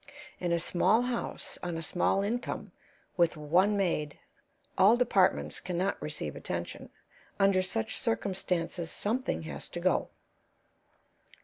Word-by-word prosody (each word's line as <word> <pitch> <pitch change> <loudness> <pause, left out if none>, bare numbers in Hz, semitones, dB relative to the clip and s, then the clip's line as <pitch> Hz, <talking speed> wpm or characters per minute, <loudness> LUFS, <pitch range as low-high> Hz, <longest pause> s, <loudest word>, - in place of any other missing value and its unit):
In 175 -1 -1
a 170 - +3
small 185 +7 +3
house, 245 -1 -3
on 175 -2 -3
a 165 - -3
small 190 +4 +1
income, 235 +5 -3 0.5
with 170 -3 +3
one 180 +8 +3
maid, 160 -6 0 0.6
all 210 +5 +6
departments 210 -7 +2
can 180 -1 -4
not 190 +3 0
receive - - -4
attention; - - -5 0.5
under 195 -1 +4
such 150 - -1
circumstances 175 - -1
something 245 +6 -1
has - - -7
to - - -5
go. - - +1
185 Hz, 125 wpm, -30 LUFS, 170-205 Hz, 0.6 s, all